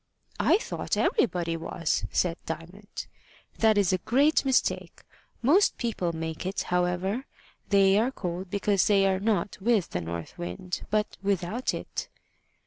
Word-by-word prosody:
"I - - +5
thought 450 - -3
everybody 175 - +1
was," 165 0 -1
said 170 -2 +1
Diamond. 175 +6 -7 0.5
"That 220 -2 +4
is 195 -2 +3
a 185 - +1
great 280 - +3
mistake. 265 -2 0 0.4
Most 350 - +4
people 215 -8 -1
make 160 -1 -4
it, 190 +2 -2
however. 180 +7 0 0.4
They 195 0 +5
are 235 +3 +2
cold 180 -6 -5
because 200 0 +2
they 200 -2 +4
are 190 -1 +2
not 205 -2 0
with 215 -3 +2
the 90 - -2
north 85 0 -6
wind, 90 - -5
but 210 0 0
without 200 +4 -1
it." - - -5
195 Hz, 140 wpm, -27 LUFS, 175-215 Hz, 0.5 s, I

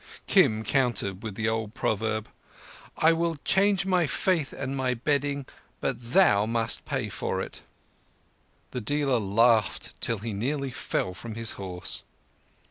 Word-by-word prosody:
Kim 110 0 +4
countered 115 -8 0
with 110 -4 -6
the 110 +1 -1
old 110 0 -2
proverb, 110 -2 -1 0.7
"I 160 +1 +5
will 165 0 0
change 195 0 +3
my 180 -4 +2
faith 165 -2 +1
and 135 0 -4
my 130 -2 0
bedding, 140 +2 0 0.3
but 120 +1 -3
thou 105 - +5
must 115 0 0
pay - - -2
for - - -2
it." - - -6 1.1
The 125 - -4
dealer 140 0 +1
laughed 110 +1 +2
till 115 - +2
he 110 +2 -5
nearly 135 +6 -2
fell 95 -5 -2
from 110 +4 -7
his 115 -1 0
horse. 90 -2 -4
120 Hz, 140 wpm, -27 LUFS, 110-145 Hz, 1.1 s, I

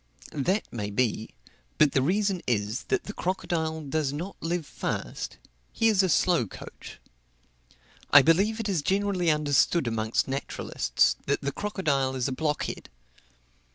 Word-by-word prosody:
That 180 +9 0
may 105 -3 -3
be; 110 0 0 0.5
but 150 -2 +5
the 135 - +2
reason 190 +4 +1
is, 110 +2 -1
that - - 0
the 210 - -7
crocodile 160 -4 -2
does 145 -1 -1
not 170 +7 -5
live 170 -1 -2
fast - - -4 0.3
he 225 - +2
is 205 -3 +4
a 190 - +1
slow 170 - +3
coach. - - -11 1.1
I 145 - +9
believe 195 - +3
it 225 - -2
is 185 -6 0
generally 190 0 +1
understood 150 +1 +2
amongst 110 -1 0
naturalists, 135 - 0
that - - +1
the 140 - -2
crocodile 140 -10 -1
is 130 0 0
a - - -2
blockhead. 150 +2 -2
155 Hz, 145 wpm, -27 LUFS, 135-185 Hz, 1.1 s, I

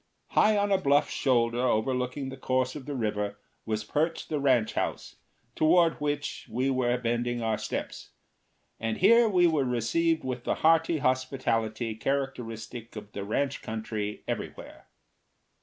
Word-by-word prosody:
High 215 0 +4
on 205 0 +1
a 195 - +4
bluff 145 -2 +3
shoulder 120 -2 +1
overlooking 125 +3 0
the 135 - -7
course 130 -1 0
of 145 -3 -8
the 145 - -3
river 105 -3 -2 0.3
was 110 -1 -1
perched 160 +8 -1
the 150 - -1
ranch 130 -5 +2
house, - - -3 0.4
toward 165 0 +3
which 145 0 -3
we 130 +3 0
were 125 -1 +1
bending 120 0 -1
our 110 -1 0
steps; - - -5 0.7
and 115 -1 -2
here 230 +4 +6
we 180 -3 +4
were 160 -4 +3
received 145 +7 +1
with 125 -2 -4
the - - 0
hearty 165 0 +4
hospitality 125 -4 0
characteristic 120 -3 -4
of 105 -1 -8
the 100 - -5
ranch 135 +7 -1
country 110 -1 -4
everywhere. - - -6
130 Hz, 145 wpm, -28 LUFS, 115-145 Hz, 0.7 s, here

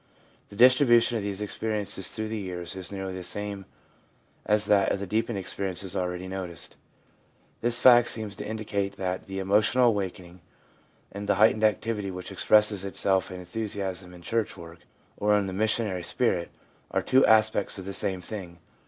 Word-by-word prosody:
The - - -12
distribution 120 0 +5
of - - -3
these 100 0 -3
experiences 105 -2 -2
through 110 -1 -3
the 110 0 -3
years 90 -2 -5
is 95 -1 -6
nearly 95 -1 -5
the 95 - -6
same 100 +1 -3 0.8
as 105 0 +3
that 100 -2 +3
of - - -1
the 100 - -4
deepened 110 +3 -1
experiences 95 -1 -4
already 90 0 -3
noticed. 95 -4 -6 0.9
This 120 0 +3
fact 120 -2 +7
seems 110 -3 -2
to - - -5
indicate 105 -2 -3
that 95 0 -3
the 95 0 -6
emotional 105 +6 +3
awakening 95 -4 -4 0.7
and 100 +1 -7
the - - +4
heightened 110 +2 +4
activity 105 -1 0
which 90 +1 -7
expresses 105 +1 +3
itself 95 -1 0
in 90 -1 -7
enthusiasm 95 -1 -4
in 90 -1 -14
church 115 +1 -2
work, 85 0 -11 0.4
or 105 0 +3
in 100 - 0
the 95 - -5
missionary 105 -2 0
spirit, 90 -2 0 0.4
are - - -1
two 130 +1 +4
aspects 110 -2 +3
of 95 - -7
the 100 - -5
same 95 -1 -2
thing. 90 -3 -8
100 Hz, 170 wpm, -27 LUFS, 95-110 Hz, 0.9 s, fact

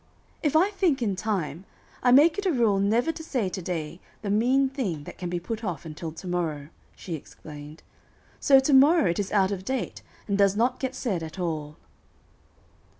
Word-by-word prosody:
"If 300 -1 0
I 370 +6 +4
think 345 -10 +1
in 200 -4 0
time, 190 -5 -3 0.4
I 250 - +4
make 310 +8 +6
it 400 - -1
a - - +3
rule 230 -8 +2
never 225 +9 +2
to 320 - -9
say 250 -11 -1
to 185 - -5
day 170 -1 -4 0.2
the 200 - -2
mean 255 +6 +3
thing 220 - -3
that - - -11
can 180 -1 -4
be 175 0 -2
put 225 +5 -5
off 175 -6 -4
until 160 +1 -6
to 165 - -11
morrow," 160 -5 -2 0.3
she 175 - -7
explained. 150 0 -10 0.6
"So 270 -1 +6
to 265 +2 +1
morrow 275 - +6
it 170 - -3
is 200 -1 -2
out 195 -1 +3
of 190 -2 -4
date, 260 +4 -3 0.3
and 200 -1 0
does 200 -1 +4
not 245 +4 +1
get 260 -1 -3
said 205 -10 -2
at 160 +2 -7
all." 155 -4 -3
200 Hz, 200 wpm, -26 LUFS, 170-265 Hz, 0.6 s, make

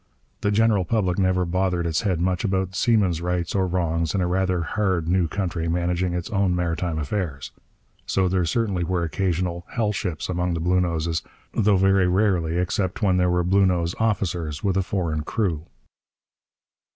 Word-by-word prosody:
The 105 - +1
general 105 -1 +3
public 95 -2 0
never 95 -1 +2
bothered 90 0 0
its 80 -2 0
head 95 -6 0
much 90 0 0
about 95 -3 -1
seamen's 95 -6 +2
rights 90 -1 -2
or 95 -2 +1
wrongs 85 -2 -1
in 95 - +1
a - - +1
rather 90 -1 0
'hard' 95 -2 -1
new 90 -1 +2
country 85 -2 -2
managing 90 +1 0
its 90 -1 -3
own 95 -3 +1
maritime 85 -1 -1
affairs. 75 -2 -3 0.6
So 95 -1 +1
there 90 0 +1
certainly 100 -2 0
were 85 0 -1
occasional 85 0 -1
'hell 110 -3 +1
ships' 90 -5 -3
among 90 -1 -1
the - - -2
Bluenoses, 85 -2 0 0.3
though 105 -3 +3
very 95 0 +3
rarely 90 -3 +1
except 95 +3 -1
when 95 -3 +3
there 90 0 +2
were 90 0 +1
Bluenose 90 -2 +2
officers 90 -9 -1
with 95 -2 +1
a 95 - +3
foreign 85 -5 -2
crew. 85 -2 -2
90 Hz, 165 wpm, -24 LUFS, 85-95 Hz, 0.6 s, general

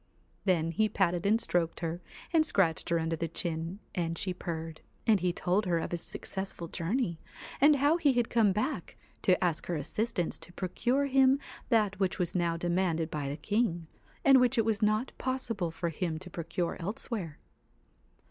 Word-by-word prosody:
Then 165 -4 +2
he 215 +6 +2
patted 180 -2 +1
and 220 +3 +4
stroked 170 -6 0
her 170 +1 -3 0.3
and 320 -2 +6
scratched 185 - +1
her 170 - +3
under 165 0 0
the 165 +1 -2
chin, 165 +2 -3 0.2
and 165 -2 -2
she 185 +2 -1
purred; 165 -2 -5 0.2
and 220 -3 +5
he 180 0 +1
told 185 +4 0
her 170 -2 +2
of 165 - -3
his 170 -1 -2
successful 190 -3 -5
journey, 170 +1 -1 0.4
and 295 +1 +7
how 290 +4 +3
he 295 -5 +3
had 240 -2 +2
come 225 -4 +3
back 215 +10 -2 0.2
to 185 -2 +3
ask 170 -3 0
her 175 - -1
assistance 180 +4 -2
to 175 - -8
procure 245 +10 0
him 270 0 +5 0.3
that 210 -5 +2
which 190 -2 +1
was 175 -3 -1
now 170 -2 +1
demanded 170 -2 0
by 145 -2 -2
the 145 - -4
king, 205 -4 0 0.4
and 270 -2 +8
which 250 +1 +3
it 225 - +3
was 220 -2 0
not 215 +4 +2
possible 235 -8 -1
for 170 +1 -3
him 165 0 -2
to 180 +2 -9
procure 170 +1 -3
elsewhere. 190 - -4
180 Hz, 180 wpm, -30 LUFS, 165-225 Hz, 0.4 s, and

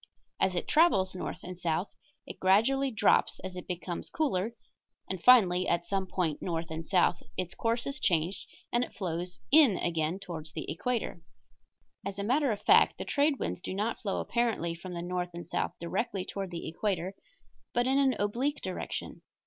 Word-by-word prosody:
As 185 - +2
it 175 - -2
travels 300 - +4
north 180 - -5
and 180 - -6
south 175 +2 -1 0.3
it - - -9
gradually 235 +9 +3
drops 220 -5 +3
as 190 -1 -6
it 180 - -7
becomes 175 -1 -4
cooler, 235 - -1 0.5
and 190 -2 -4
finally 190 -8 +6
at 170 0 +1
some 190 +1 -1
point 170 -5 -1
north 165 -2 -3
and 160 +1 -4
south 175 0 +2 0.2
its 185 -1 -2
course 230 +1 -1
is 280 +1 -3
changed 175 - 0 0.3
and 240 +1 +3
it - - -8
flows 175 -1 -4
in 280 - +7
again 165 0 0
toward 165 -5 -7
the - - -4
equator. 225 +1 -2 0.8
As 195 0 -5
a 200 - -2
matter 265 +5 +2
of 205 -1 -4
fact, 440 +3 +6
the - - -5
trade 285 0 +2
winds - - -3
do 185 - -5
not 215 +4 -1
flow 200 -3 -1
apparently 230 -8 0
from 175 +2 -8
the 170 - -4
north 180 0 -2
and 175 - -6
south - - -2
directly 185 +2 -2
toward 195 -2 -4
the 170 -1 -6
equator, 185 +1 -2 0.6
but 245 0 +1
in 265 +2 +3
an 270 -2 +3
oblique 245 +8 -1
direction. - - -5
190 Hz, 180 wpm, -30 LUFS, 175-240 Hz, 0.8 s, in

